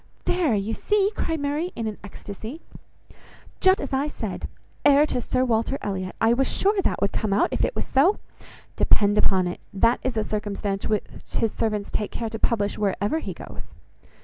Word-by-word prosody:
"There! 335 -10 +2
you 205 +2 -1
see!" 415 - +2
cried 325 -1 -1
Mary 295 +5 -1
in 230 - -3
an 215 -2 -4
ecstasy, 210 - -8 1.0
"just 375 0 +5
as 280 - -5
I 270 +2 +1
said! - - -5 0.4
Heir 285 +1 +6
to 250 - -1
Sir 255 +2 +1
Walter 230 +3 +1
Elliot! 185 -2 -3
I 225 +1 +4
was 270 +2 +1
sure 400 0 +2
that - - 0
would 200 - +2
come 210 -3 -1
out, 200 - +3
if - - 0
it - - 0
was - - -2
so. 325 +10 +3 0.6
Depend 205 0 +4
upon 190 -3 +3
it, 175 - -4
that 230 +5 +3
is 255 -3 -2
a 215 - +2
circumstance 205 -2 -2
which 215 -1 +1 0.3
his 225 - +1
servants 210 -2 -2
take 210 - -1
care 230 -1 -4
to 225 - -5
publish, 205 -4 0
wherever 205 +7 0
he - - -6
goes. - - -9
225 Hz, 190 wpm, -25 LUFS, 205-285 Hz, 1.0 s, Heir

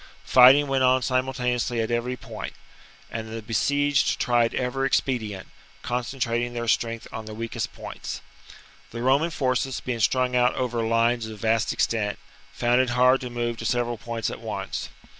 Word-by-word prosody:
Fighting 130 +3 +7
went 135 -1 +1
on 130 0 +4
simultaneously 125 -2 0
at 115 +1 -1
every 120 +2 -1
point; - - -7 0.6
and 110 -1 -5
the 115 - -4
besieged 145 +6 +1
tried 120 -1 +2
every 130 +2 0
expedient, 110 -8 -1 0.4
concentrating 120 -1 -2
their 120 0 -3
strength 115 0 0
on 110 - -6
the 110 0 -8
weakest 115 +1 -4
points. - - -7 0.7
The 115 +1 -6
Roman 140 +6 +3
forces, 130 -3 -1
being 125 -2 -4
strung 125 +2 +2
out 125 0 +3
over 120 -3 -1
lines 115 0 +1
of 110 -1 -9
vast 115 +1 +1
extent, 105 -3 0 0.3
found 125 -2 +2
it 130 - 0
hard 125 +2 +4
to 125 - -5
move 120 -1 -2
to 115 - -6
several 120 -1 -1
points 115 -1 -3
at - - -8
once. - - -4
120 Hz, 160 wpm, -25 LUFS, 115-130 Hz, 0.7 s, Fighting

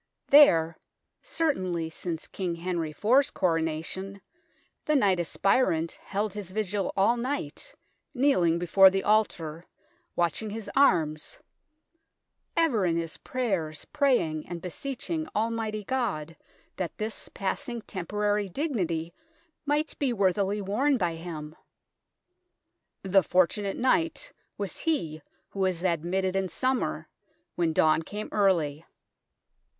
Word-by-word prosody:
There, 165 - +6 0.4
certainly 185 - -1
since 165 0 -4
King 180 -3 -3
Henry 170 -2 -2
IV's 250 - +3
Coronation, 165 - -2 0.6
the 305 - +1
knight 195 -9 +3
aspirant 175 -1 +1
held 205 0 -2
his 205 -3 -6
vigil 200 -1 -2
all 205 +5 +4
night, 260 - -4 0.4
kneeling 245 - +3
before 190 +3 +6
the 195 0 -1
altar, 170 -7 +1 0.5
watching 175 +5 0
his 215 0 -6
arms, 160 - +2 0.6
" 325 +1 -37
ever 225 -9 0
in 170 -2 +1
his 165 -1 -4
prayers 190 -12 -2
praying 245 - +1
and 175 -1 -4
beseeching 275 - -4
Almighty 220 -1 -1
God 195 - -2 0.4
that 180 -4 -4
this 215 +1 -5
passing 230 +4 -3
temporary 205 +2 -1
dignity 175 - -2 0.5
might 295 +2 0
be 270 -4 +1
worthily 200 0 +1
worn 260 +9 +2
by 175 -6 0
him." 160 -2 -7 1.5
The 195 0 +4
fortunate 185 +3 +1
knight 330 - +1 0.2
was - - -4
he 165 - -1 0.3
who 195 - -8
was 185 -2 0
admitted 185 +2 0
in 190 -1 0
summer, 260 +5 -1 0.5
when 170 -2 +1
dawn 155 0 +3
came 210 +6 -6
early. 165 -7 +2
195 Hz, 115 wpm, -28 LUFS, 170-235 Hz, 1.5 s, There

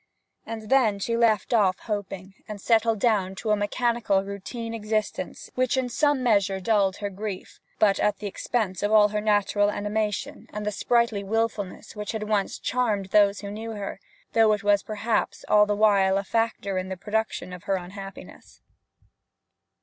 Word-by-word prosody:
And 220 -1 -7
then 235 -7 +4
she 230 +4 -2
left 230 0 +2
off 195 -5 +3
hoping, 195 -3 -5
and 210 -1 -7
settled 225 0 +2
down 200 -5 +1
to 215 +2 -2
a - - +5
mechanical 210 -1 0
routine 215 +4 -6
of - - -3
existence 215 0 -3
which 255 +1 +1
in 255 -1 0
some 290 +1 +1
measure 200 -5 +2
dulled 195 -1 +1
her 205 -1 -3
grief; 200 -1 -6 0.2
but 200 -2 +3
at 210 -1 +1
the 210 - -8
expense 205 -1 -2
of 205 - 0
all 210 -1 +6
her 210 0 -2
natural 205 -1 +2
animation 210 -1 -3
and 210 0 -5
the 210 - 0
sprightly 235 -1 +1
wilfulness 215 -2 -2
which 210 0 -4
had 220 -1 -3
once 210 -2 -1
charmed 215 -6 -1
those 205 -1 +4
who 200 -1 -6
knew 225 +2 -6
her, 200 -2 -6 0.3
though 225 -1 +5
it 205 -1 -3
was 205 -1 +3
perhaps 215 +2 -2
all 210 0 +5
the 205 - +1
while 200 -2 +4
a 195 - -1
factor 200 -3 -1
in 185 0 -5
the 190 - -4
production 210 -2 -2
of 180 - -10
her 195 - +1
unhappiness. 195 +2 -9
210 Hz, 175 wpm, -25 LUFS, 200-225 Hz, 0.3 s, all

